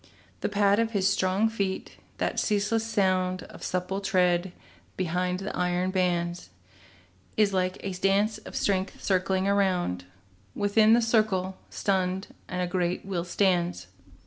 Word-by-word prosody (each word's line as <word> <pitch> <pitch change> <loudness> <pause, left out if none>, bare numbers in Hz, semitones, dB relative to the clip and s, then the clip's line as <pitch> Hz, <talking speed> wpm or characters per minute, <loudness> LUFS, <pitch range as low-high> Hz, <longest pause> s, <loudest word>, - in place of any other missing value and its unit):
The - - -1
pad 200 0 +3
of 230 0 0
his 195 -2 +2
strong 195 +2 +2
feet, 200 -4 -3 0.2
that - - -1
ceaseless 210 +1 +1
sound 185 -4 +1
Of - - -13
supple 185 +2 -2
tread 180 -2 +2 0.5
behind 180 0 0
the 200 - -4
iron 180 +1 0
bands, 175 - -1 0.9
Is 210 -2 +3
like 185 0 0
a 195 - -4
dance 195 +3 +1
of - - -11
strength 190 -1 -1
circling 190 0 +1
around, 185 - +1 0.5
While 205 0 -1
in 220 0 +7
the 235 0 +4
circle, 215 -5 +1
stunned, 190 -1 -1 0.2
a 180 0 -1
great 180 0 -1
will 185 -3 -2
stands. 175 - +1
190 Hz, 140 wpm, -27 LUFS, 180-200 Hz, 0.9 s, in